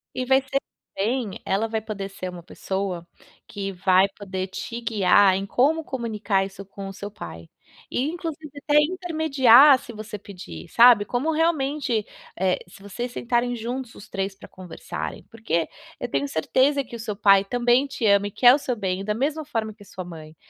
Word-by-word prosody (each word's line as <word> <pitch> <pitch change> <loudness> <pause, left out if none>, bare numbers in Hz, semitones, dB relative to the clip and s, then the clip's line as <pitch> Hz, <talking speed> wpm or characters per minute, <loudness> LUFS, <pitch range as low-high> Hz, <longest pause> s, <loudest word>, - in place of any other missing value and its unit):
E 255 - -2
vai 265 +1 +4
ser 270 +1 -1 0.4
bem, 220 0 -2
ela 205 +4 0
vai 220 0 -2
poder 205 -2 -5
ser 185 -1 -6
uma 175 -1 -9
pessoa 190 -1 -4 0.4
que 200 -1 -5
vai 185 +1 +3
poder 190 -2 -4
te 230 +5 -6
guiar, 200 -3 +4
em 195 - -3
como 295 +10 +2
comunicar 215 -6 -1
isso 195 0 -10
com 195 0 -8
o - - -8
seu 205 +1 -7
pai, 85 - -10 0.4
e 250 - -1
inclusive 320 -3 -6
até 295 +1 +2
intermediar, 300 -6 +5
se 240 - -11
você 215 -1 -7
pedir, 180 - -10
sabe, 235 -3 +7
como 255 +9 -1
realmente, 290 -8 0 0.3
eh, 185 0 +1
se 195 +2 -16
vocês 240 +5 -5
sentarem 245 0 0
juntos 240 +1 -5
os - - -13
3 195 0 -3
pra - - -14
conversarem, 185 -2 -7
porque 220 -8 -1 0.3
eu - - -5
tenho 140 +1 0
certeza 260 - +1
que 240 - -10
o - - -14
seu 220 -2 -4
pai 195 -1 +5
também 245 +4 +2
te 265 -4 -4
ama 200 -1 +4
e - - -7
quer 245 +4 +6
o - - +4
seu 255 -3 -2
bem 190 -2 -3
da 210 - 0
mesma 295 +7 -2
forma 225 -6 -3
que 205 -1 -16
a - - -18
sua 185 -1 -8
mãe, 160 -3 -11
215 Hz, 190 wpm, -24 LUFS, 195-260 Hz, 0.4 s, sabe